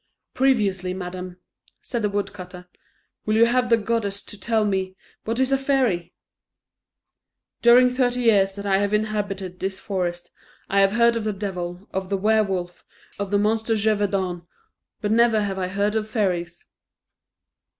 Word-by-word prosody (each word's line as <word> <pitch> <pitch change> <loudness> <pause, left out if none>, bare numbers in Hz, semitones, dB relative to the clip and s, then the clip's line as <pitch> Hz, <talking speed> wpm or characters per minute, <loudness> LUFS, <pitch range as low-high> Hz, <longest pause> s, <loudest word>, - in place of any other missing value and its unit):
"Previously, 200 -9 +1
madam," 180 0 -6 0.4
said 240 - -4
the 210 - +1
woodcutter, 195 -3 -5 0.6
"will 215 - +2
you 225 +1 +6
have 250 +1 +1
the 230 - +5
goodness 210 -2 -2
to - - -7
tell 220 +1 +1
me, 190 -2 -1 0.3
what 230 +2 -2
is 260 0 +2
a 270 - +3
fairy? 250 -11 0 1.5
During 245 +2 +7
thirty 250 -1 0
years 200 -5 +3
that 200 +1 -8
I 195 -1 +2
have 205 +1 +1
inhabited 200 -4 -3
this 190 0 -3
forest, 175 -3 -3 0.4
I 200 0 +3
have 195 0 +3
heard 235 +1 +4
of 230 - -2
the 215 - 0
devil, 185 -2 -5
of 190 0 -3
the 200 - 0
Were 215 +3 +3
wolf, 180 -3 -4 0.4
of 200 -1 -3
the 205 - +2
monster 220 +2 +1
of 220 - 0
Gévaudan, 195 -5 0 0.5
but 210 -1 -1
never 225 -1 +4
have 195 -1 -3
I 185 - -1
heard 200 +2 0
of 220 -1 -2
fairies." 175 -6 -2
205 Hz, 160 wpm, -23 LUFS, 190-225 Hz, 1.5 s, During